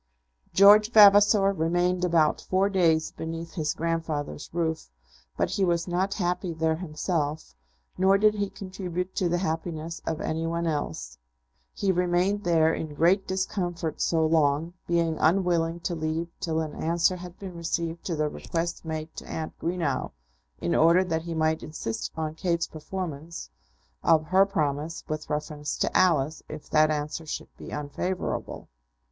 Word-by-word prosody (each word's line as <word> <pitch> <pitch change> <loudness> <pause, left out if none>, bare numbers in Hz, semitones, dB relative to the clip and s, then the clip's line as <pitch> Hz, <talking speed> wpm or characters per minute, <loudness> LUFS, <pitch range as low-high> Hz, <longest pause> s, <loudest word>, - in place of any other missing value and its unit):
George 205 +2 +7
Vavasor 205 -2 +7
remained 175 +1 +1
about 165 -3 +3
four 190 +2 +1
days 165 -5 +2
beneath 165 +1 -6
his 155 -4 -1
grandfather's 160 -3 -3
roof; 160 - -2 0.5
but - - 0
he 195 - 0
was 170 -2 +1
not 185 +3 0
happy 180 -2 -1
there 160 0 +1
himself, 155 - -3 0.5
nor 190 +1 +5
did 210 +1 +4
he 205 -1 -2
contribute 185 -2 -5
to 180 - 0
the 175 - +1
happiness 165 -1 -3
of 160 - -1
any 160 +1 -2
one 170 +1 -1
else. 80 - -3 0.6
He 195 - +1
remained 180 +3 +1
there 160 -2 +3
in 155 -2 -5
great 180 +6 +3
discomfort 180 -4 -2
so 160 -1 +2
long, 155 +1 +2
being 170 -2 +1
unwilling 170 -1 +2
to 175 - -2
leave 160 +1 -2
till 160 -1 -1
an 155 -2 -4
answer 170 +3 +1
had 180 0 -10
been 190 -3 -8
received 170 0 -3
to 170 - -1
the 155 0 0
request 165 +3 -3
made 160 -1 -5
to - - -8
Aunt 160 -1 -4
Greenow, 165 - -2 0.5
in 85 - -1
order 170 - +5
that 165 -3 -1
he 165 0 -5
might 160 0 +1
insist 150 -7 -5
on 155 -1 -2
Kate's 170 0 0
performance 160 - -6 0.5
of 155 -1 +4
her 190 +2 +5
promise 155 -2 -2
with 155 -1 -4
reference 150 0 -3
to - - -1
Alice, 155 -4 +3
if 155 -1 -8
that 155 0 +5
answer 150 +1 -3
should - - -6
be - - -10
unfavourable. 150 +6 -4
165 Hz, 155 wpm, -27 LUFS, 155-180 Hz, 0.6 s, George